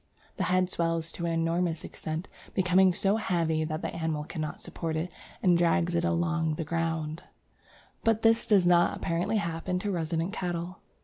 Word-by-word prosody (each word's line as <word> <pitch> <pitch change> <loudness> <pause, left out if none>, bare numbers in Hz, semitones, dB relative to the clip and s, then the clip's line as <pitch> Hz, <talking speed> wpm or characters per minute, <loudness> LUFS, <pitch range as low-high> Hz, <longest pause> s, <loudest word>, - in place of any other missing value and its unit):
"The - - 0
head 185 0 +2
swells 165 -1 -1
to 170 - -4
an - - 0
enormous 165 0 0
extent, 160 +4 -5 0.3
becoming 185 0 +5
so 195 +4 +1
heavy 165 -6 0
that 155 +1 -4
the - - -3
animal 160 -2 -1
cannot 155 -1 -5
support 165 -2 -4
it, 165 +3 -2 0.3
and 180 -3 +5
drags 175 0 +2
it 170 0 +1
along 170 -2 +1
the 165 - -3
ground"; 165 -1 -2 0.8
but 225 -1 +2
this 225 0 +4
does 200 -4 +5
not 175 -1 +4
apparently 170 +6 0
happen 170 -1 -2
to 200 +3 -2
resident 165 +1 -1
cattle. 175 -2 -3
170 Hz, 170 wpm, -29 LUFS, 165-180 Hz, 0.8 s, becoming